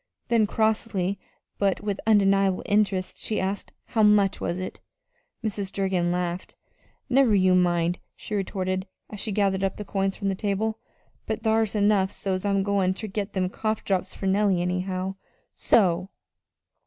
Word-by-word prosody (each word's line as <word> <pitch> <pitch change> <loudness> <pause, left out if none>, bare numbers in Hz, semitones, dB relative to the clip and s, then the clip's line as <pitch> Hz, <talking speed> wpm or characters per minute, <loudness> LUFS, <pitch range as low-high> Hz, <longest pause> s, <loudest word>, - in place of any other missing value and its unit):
Then, 230 -3 +3
crossly, 210 -3 0 0.4
but 195 -2 +1
with 205 -1 -2
undeniable 195 -3 +3
interest, 200 -3 +1
she 215 - -1
asked: 195 +1 -3
"How 225 - 0
much 210 -2 +4
was 170 - -1
it?" 185 0 -6 0.6
Mrs. 200 -3 -3
Durgin 190 -3 0
laughed. 175 0 -3 0.5
"Never 255 -4 +4
you 185 -1 +4
mind," 175 -1 +2 0.2
she - - -8
retorted, 190 -1 -2 0.2
as 210 - -7
she 215 - -3
gathered 195 -1 +1
up 195 - -1
the 210 - -6
coins 195 0 -1
from 200 - -2
the - - +1
table; 210 +3 -1 0.5
"but 220 0 -3
thar's 220 -1 +2
enough 205 -2 +3
so's 190 -1 -2
I'm 200 -1 +2
goin' 195 -2 +1
ter 220 - -5
get 205 0 -4
them 185 -2 0
cough 215 +3 -2
drops 190 -1 -1
fur - - -6
Nellie, 190 -2 +2
anyhow. 185 +1 -2 0.4
So!" 185 -3 +2
195 Hz, 155 wpm, -25 LUFS, 185-210 Hz, 0.6 s, much